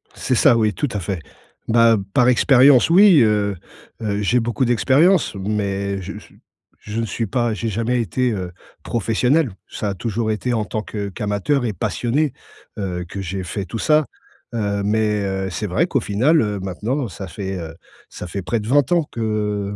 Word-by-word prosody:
C'est - - -1
ça, 115 - +5
oui, 110 -2 +2
tout 145 - -2
à 105 - -2
fait. 90 -1 -4 0.5
Bah, 115 0 +5 0.2
par 125 0 +4
expérience, 130 +2 +5
oui, 185 -2 +7
heu 105 -2 +2 0.5
heu, 105 -1 -1
j'ai 120 +5 +2
beaucoup 120 +2 -1
d'expérience, 135 - +3
mais 100 -1 -2
je 95 +3 -7
je - - -17 0.5
je 110 +2 -4
ne - - -1
suis 115 0 -3
pas 120 0 0
j'ai 110 +3 -3
jamais 115 +4 -1
été, 125 +2 0
heu, 90 -4 -4 0.3
professionnel. 125 +5 +1 0.2
Ça 105 - -3
a 100 - -2
toujours 110 +2 -2
été 120 +3 -2
en 110 -2 0
tant 110 0 -3
que 100 -2 -5
qu'amateur 105 +8 -1
et 110 - -1
passionné, 125 - -1 0.5
heu, 90 -3 -3
que 100 - -7
j'ai 95 +1 -4
fait 95 +2 -4
tout 110 +5 -6
ça, 155 -1 +3 0.5
heu, 100 -2 -1
mais, 105 0 +1
heu, 95 0 -2
c'est 105 +3 -3
vrai 150 - +1
qu'au 140 - +1
final, 125 +10 +2
heu, 105 -2 -2
maintenant, 110 +8 -3
ça 95 +1 -8
fait, 95 +2 -5
heu, 80 0 -7 0.3
ça - - -8
fait 100 +3 -4
près 115 +5 -1
de 105 - -7
20 140 +3 +2
ans 170 -2 +3
que 105 -3 -2
110 Hz, 190 wpm, -20 LUFS, 100-125 Hz, 0.5 s, oui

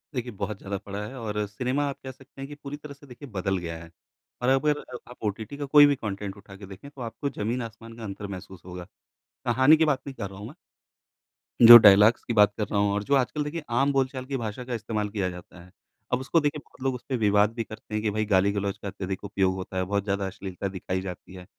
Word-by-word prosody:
देखिए, 125 -1 -3
बहुत 100 0 -4
ज़्यादा 100 0 -4
पड़ा 100 +2 -6
है 135 - -9
और 105 -2 -2
सिनेमा 125 +7 -1
आप 140 - -7
कह 130 - -6
सकते 135 +1 -15
हैं 135 - -5
कि 145 - -9
पूरी 145 0 -8
तरह 150 -1 -10
से, 140 0 -18
देखिए, 130 +3 -11
बदल 95 -1 -1
गया 85 -2 -5
है। 85 - -14 0.5
और 125 - +2
अब 135 +3 +3
अगर 145 -4 -3
आप - - -12
ओटीटी 110 +6 -4
का 145 - -3
कोई 145 +1 +8
भी 145 -1 +3
कॉन्टेंट 100 -3 -5
उठा 100 -1 -13
के 100 0 -11
देखें, 95 +9 -11
तो 135 - -12
आपको 120 +5 -4
ज़मीन-आसमान 115 0 -5
का 115 - -9
अंतर 100 0 -6
महसूस 95 -1 -9
होगा। 90 0 -8 0.6
कहानी 130 +6 +5
की 160 - +3
बात 140 -4 +1
नहीं 135 - -6
कर 100 - -5
रहा 95 0 -11
हूँ 105 - -7
मैं। 145 - -11 1.1
जो 120 0 +14
डायलॉग्स 105 +1 +6
की 120 - -3
बात 105 -1 +5
कर 105 - 0
रहा 100 - 0
हूँ 100 0 +2
और 105 0 -1
जो 140 - +2
आजकल, 140 +3 0
देखिए, 150 +2 -5
आम 135 +4 +2
बोल-चाल 130 -1 -1
की 135 0 -3
भाषा 115 +1 -5
का 125 - -5
इस्तेमाल 105 -2 -2
किया 100 -3 -1
जाता 90 0 -11
है। 90 - -18 0.4
अब 125 - +2
उसको, 140 +5 +2
देखिए, 150 0 -1
बहुत - - -22
लोग 130 -1 0
उसपे 130 +1 -4
विवाद 105 0 +3
भी 115 -1 -3
करते 110 0 -11
हैं 105 - 0
कि, 105 - +1
"भाई, 110 +1 -1
गाली-गलौच 100 0 +1
का 100 - -8
अत्यधिक 95 0 -5
उपयोग 95 -2 +1
होता 95 0 -6
है। 95 - +1
बहुत 100 +1 -1
ज़्यादा 100 -1 -1
अश्लीलता 95 -1 -5
दिखाई 95 -1 -3
जाती 90 0 -8
है।" 90 -1 -10
105 Hz, 250 wpm, -26 LUFS, 100-130 Hz, 1.1 s, जो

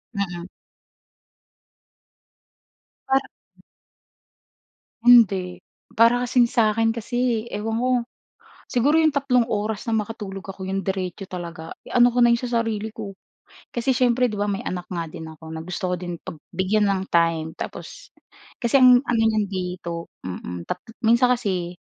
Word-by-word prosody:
Mm. 175 -3 -3 2.6
Para 270 +1 +3 1.8
Hindi. 195 -7 +5 0.4
Para 235 +2 +5
kasing 245 0 +4
sa'kin 225 -1 +2
kasi, 235 0 -1
eh, - - -4
ewan 225 +1 -2
ko. 255 - +1 0.8
Siguro 275 +6 +2
'yong 315 -1 +3
tatlong 270 -4 +2
oras 210 -1 -2
na - - 0
makatulog 210 -3 -4
ako, 195 -1 -7
'yong 195 +1 -1
diretso 190 0 -3
talaga, 170 -2 -7 0.2
ano 245 0 +6
ko 245 - +1
na 240 - +6
'yon 235 - +1
sa 250 - -4
sarili 220 -1 -2
ko. 210 -3 -6 0.6
Kasi 240 +2 -2
siyempre 250 0 +3
'di - - -7
ba 205 - 0
may 195 -1 -2
anak 180 -1 -4
nga 170 -2 -3
din 160 - -8
ako 160 0 -14
na 160 - -5
gusto 180 0 -3
ko - - +1
din 175 -1 -5
pag - - -8 0.2
bigyan 200 +4 +1
ng 195 -1 +1
time. 165 -1 +2
Tapos - - -8 0.5
kasi 240 +2 +3
ang 250 -1 +9
ano 235 -2 +1
niyan 220 -2 +2
dito 180 -2 -4 0.2
mm. 90 -1 -6
Tat 180 - -4 0.3
minsan 235 +2 +5
kasi 185 -7 -3
210 Hz, 150 wpm, -23 LUFS, 180-240 Hz, 2.6 s, ang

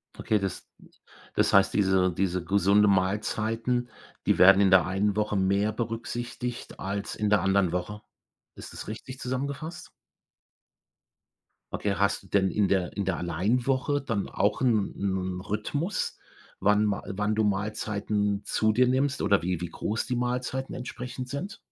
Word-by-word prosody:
Okay, 105 -1 0
das 95 -2 -4 0.7
das - - +2
heißt, - - +5
diese 95 -2 +3
diese 90 0 -1
gesunde 100 +2 +4
Mahlzeiten, 110 +5 0 0.4
die - - +3
werden 95 +2 +8
in 100 -1 +4
der 95 -3 +6
einen 95 +2 0
Woche 105 0 0
mehr 100 +2 +2
berücksichtigt 120 +2 -5
als 100 +1 -4
in 105 -1 0
der 105 - +4
anderen 95 -2 +2
Woche. 90 +4 -4 0.5
Ist - - -10
das - - -8
richtig 130 +4 -7
zusammengefasst? 140 +6 -4 1.8
Okay, 100 -2 -1
hast 100 +1 +1
du - - -17
denn 95 -1 +2
in 100 +2 +1
der 95 -3 0
in 100 - -1
der 95 -4 -1
Allein-Woche 125 - 0
dann 115 -7 -2
auch 105 +1 0
'n 115 -6 +2
'n 95 -2 -2
Rhythmus, 125 - -2 0.4
wann 105 +1 +4
Ma 100 -1 0
äh, - - -5
wann 105 +1 0
du 110 - +2
Mahlzeiten 105 0 -1
zu 110 0 +2
dir 125 +4 +3
nimmst 135 +2 +1
oder 100 - +3
wie 90 0 -1
wie 90 - -3
groß 110 +6 -2
die 125 - -2
Mahlzeiten 125 +2 -2
entsprechend 125 +1 -6
sind? 175 +11 -5
105 Hz, 155 wpm, -27 LUFS, 95-120 Hz, 1.8 s, werden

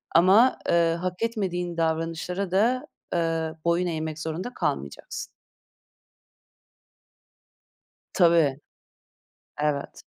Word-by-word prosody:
ama, 195 +9 +6
eee, 170 -1 +3
hak 185 0 -3
etmediğin 180 -7 -2
davranışlara 165 +3 -1
da, 235 +7 +2 0.3
eee, 165 -1 0
boyun 170 +1 +2
eğmek 160 -2 -3
zorunda 160 +9 -4
kalmayacaksın." 70 - -3 2.9
Tabii. 165 -6 +4 1.0
Evet. 150 -2 -2
170 Hz, 75 wpm, -26 LUFS, 160-185 Hz, 2.9 s, ama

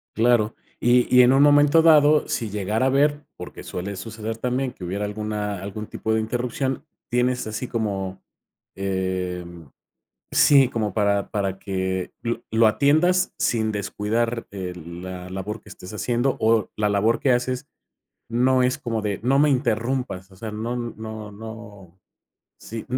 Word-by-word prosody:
Claro, 115 -1 +3 0.2
y 120 +1 +3
y 125 - +9
en 125 +1 +5
un 135 +1 +5
momento 145 +2 +6
dado, 155 -2 +5
si 115 - -2
llegara 105 +4 -1
a - - +4
ver 145 +2 +2
porque - - -9
suele 95 +3 -5
suceder 110 +3 -5
también 125 +2 -1
que 90 - -10
hubiera 100 +4 -2
alguna 105 -1 -3
algún 100 +2 -6
tipo 110 - -2
de 110 - +2
interrupción. 125 +5 -2 0.3
Tienes 125 0 +1
así 110 +4 -4
como 100 -5 -3 0.5
eh 95 -2 -2 0.9
sí, 135 -3 +6
como 110 -5 -2
para 100 -1 +1
para 100 -2 -1
que 95 -1 -3 0.4
lo 110 0 +5
atiendas 155 +11 +3
sin 110 -2 +1
descuidar, 110 +3 -2
eh, 95 -3 -5
la 90 +2 -8
labor 100 +4 -5
que - - -16
estés 95 0 -10
haciendo 120 +4 0
o 110 -1 +2
la 105 -1 +1
labor 105 +3 +2
que 135 - +2
haces 125 +1 0 0.6
no 125 +2 +3
es 125 0 +1
como 115 -3 -2
de 100 -2 -2
no 130 +4 +2
me 150 +1 +4
interrumpas. 120 -5 -1
O - - -16
sea, 110 +3 -6
no 115 +3 -3
no 110 -3 -6
no 105 -4 -11 0.6
sí, 115 0 -7
mm 125 - 0
110 Hz, 155 wpm, -23 LUFS, 100-125 Hz, 0.9 s, y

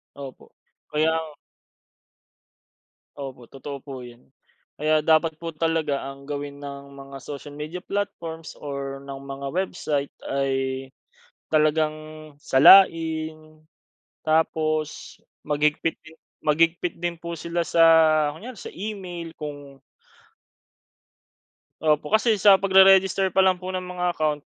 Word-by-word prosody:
Opo. 135 -2 -11 0.4
Kaya 155 +2 +2
nga 160 -1 -4 1.8
Opo, 135 -3 -8
totoo 140 +1 -7
po 135 -3 -8
yun. 120 +2 -17 0.5
Kaya 155 0 +2
dapat 160 0 +3
po 165 +1 -6
talaga 160 -3 -1
ang 135 0 -10
gawin 145 0 -6
ng 140 0 -9
mga 135 0 -10
social 145 +1 -8
media 155 +5 -7
platforms 165 -6 -5
or 140 -1 -6
ng 140 -1 -8
mga 140 0 -7
website, 155 -5 -2 0.2
ay, 135 -1 -1 0.6
talagang 155 0 +2 0.4
salain. 155 0 +4 0.6
Tapos, 155 -1 -1 0.3
maghigpit 150 +2 0
din 160 0 -16 0.2
maghigpit 165 +3 +1
din 175 -1 -4
po 170 -1 -5
sila 170 +1 -2
sa 165 0 +4 0.5
kunyari 225 +10 -10
sa - - -9
email 185 -4 -6
kung 145 -2 -8 2.0
Opo, 150 +1 +1
kasi 220 0 +3
sa 195 -1 +6
pagre-register 190 0 +5
pa 190 - +4
lang 190 -1 +3
po 185 +1 -6
ng 185 - -2
mga 180 -1 -2
account. 150 -2 -1
155 Hz, 115 wpm, -24 LUFS, 140-170 Hz, 2.0 s, sa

